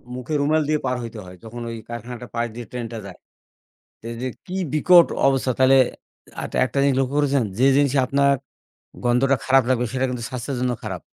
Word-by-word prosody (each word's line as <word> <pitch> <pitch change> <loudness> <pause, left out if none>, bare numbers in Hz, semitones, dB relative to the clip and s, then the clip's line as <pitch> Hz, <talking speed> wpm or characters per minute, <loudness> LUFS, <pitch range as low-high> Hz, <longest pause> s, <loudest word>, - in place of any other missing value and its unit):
মুখে 125 +4 -5
রুমাল 155 +2 +2
দিয়ে 155 -1 +1
পার 125 0 0
হইতে 115 -1 -7
হয়। 90 0 -11
যখন 120 +2 -8
ওই 115 - -5
কারখানাটা 120 +1 -7
পাশ 120 0 0
দিয়ে 120 -1 -7
ট্রেনটা 120 -2 -5
যায়। 95 -2 -10 0.8
তে 115 - -9
দে 130 - -2 0.2
কি 185 - -6 0.2
বিকট 170 +2 +6 0.2
অবস্থা! 135 -1 +1
তাহলে 130 +1 +6 0.7
আট - - -6
আরেকটা 130 +2 +1
জিনিস 140 -2 +3
লক্ষ্য 135 +2 -1
করেছেন? 140 -3 +2
যে, 130 - +3
জিনিসে 140 -1 +3
আপনার 140 +1 +3 0.7
গন্ধটা 130 +3 +3
খারাপ 135 -1 +5
লাগবে, 125 -1 +2
সেটা 130 0 +1
কিন্তু 125 -2 -4
স্বাস্থ্যের 125 +2 -4
জন্য 125 -1 +1
খারাপ। 95 -5 -5
130 Hz, 190 wpm, -22 LUFS, 120-140 Hz, 0.8 s, বিকট